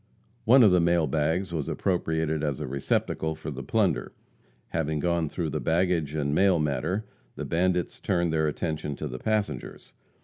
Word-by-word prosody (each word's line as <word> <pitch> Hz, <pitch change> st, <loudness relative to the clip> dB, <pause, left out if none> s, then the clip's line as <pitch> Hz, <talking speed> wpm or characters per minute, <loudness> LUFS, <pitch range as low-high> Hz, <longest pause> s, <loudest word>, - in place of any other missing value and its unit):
One 125 Hz, +3 st, +7 dB
of 105 Hz, -, +7 dB
the 90 Hz, -, +5 dB
mail 85 Hz, -1 st, +3 dB
bags 80 Hz, +6 st, 0 dB
was 75 Hz, -4 st, -2 dB
appropriated 80 Hz, -4 st, -1 dB
as 75 Hz, -3 st, -1 dB
a 75 Hz, -, -3 dB
receptacle 70 Hz, +4 st, -1 dB
for 75 Hz, 0 st, -6 dB
the 70 Hz, -1 st, -6 dB
plunder. -, -, 0 dB, 0.6 s
Having 80 Hz, -2 st, -1 dB
gone 85 Hz, -3 st, 0 dB
through 80 Hz, -2 st, -3 dB
the -, -, -2 dB
baggage 80 Hz, -3 st, +1 dB
and 70 Hz, -2 st, 0 dB
mail 95 Hz, +2 st, +4 dB
matter, 75 Hz, +7 st, -1 dB, 0.3 s
the -, -, -5 dB
bandits 90 Hz, +1 st, 0 dB
turned 85 Hz, -3 st, 0 dB
their 80 Hz, -1 st, +2 dB
attention 75 Hz, -1 st, -3 dB
to 75 Hz, -, -5 dB
the 65 Hz, -2 st, -6 dB
passengers. 110 Hz, +2 st, -3 dB
80 Hz, 170 wpm, -27 LUFS, 75-90 Hz, 0.6 s, One